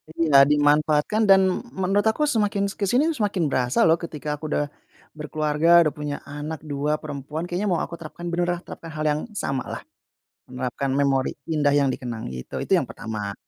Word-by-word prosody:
Iya 140 -4 +5
dimanfaatkan 150 +6 +3
dan 195 -1 +7
m 245 - -5 0.2
menurut 200 +3 +2
aku 220 +7 +1
semakin 210 -7 +1
s - - -12
ke 200 - 0
sini 285 - +3
semakin 205 - -1
berasa 125 0 +2
loh, 165 0 +4
ketika 150 -3 -5
aku 155 - -5
udah, 145 -1 -1 0.4
berkeluarga 155 +2 +3
udah 155 - +1
punya 145 -1 -3
anak 150 +2 -6
2 150 0 -1
perempuan 150 +1 -6
kayaknya 175 +4 -2
mau 175 -3 +1
aku 170 - -7
terapkan 170 +2 -7
beneran 175 0 -1
terapkan 165 -1 -9
hal 155 - -3
yang 150 +1 -1
sama 135 -8 -2
lah. - - -5 0.7
Menerapkan 125 +1 -3
memori 135 -1 +1 0.2
indah 150 -3 +2
yang 140 -2 +3
dikenang 120 - -5
gitu. 65 0 -7
Itu - - -4
yang - - -1
pertama. 105 -2 -5
150 Hz, 185 wpm, -24 LUFS, 140-175 Hz, 0.7 s, dan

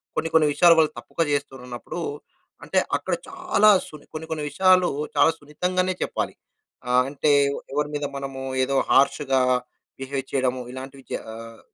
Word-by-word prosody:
కొన్ని 160 +1 -1
కొన్ని 160 -2 +5
విషయాలు 170 +1 +6
వాళ్ళు 155 - +3
తప్పుగా 165 - -2
చేస్తురన్నప్పుడు 135 +1 -4 0.6
అంటే, - - +1 0.2
అక్కడ - - -4 0.2
చాలా 360 - +3 0.2
సుని 150 -2 -13
కొన్ని 160 +1 -6
కొన్ని 155 -2 -2
విషయాలు 185 +3 +4 0.3
చాలా 145 +3 +5
సున్నితంగానే 180 +5 -1
చెప్పాలి. - - -3 0.5
ఆహ్, 125 0 +4
అంటే, 145 +1 +1 0.2
వొ - - -5
ఎవరి 150 +1 0
మీద 145 0 -2
మనము 135 -1 -5 0.2
ఏదో 135 +1 -1 0.2
హార్ష్‌గా 135 -1 +3 0.6
బిహేవ్ 135 0 -3
చేయడము, 130 -1 0
ఇలాంటివి 135 +1 -9
చె - - -2 0.2
ఆహ్, 115 0 -10
145 Hz, 150 wpm, -24 LUFS, 135-165 Hz, 0.6 s, విషయాలు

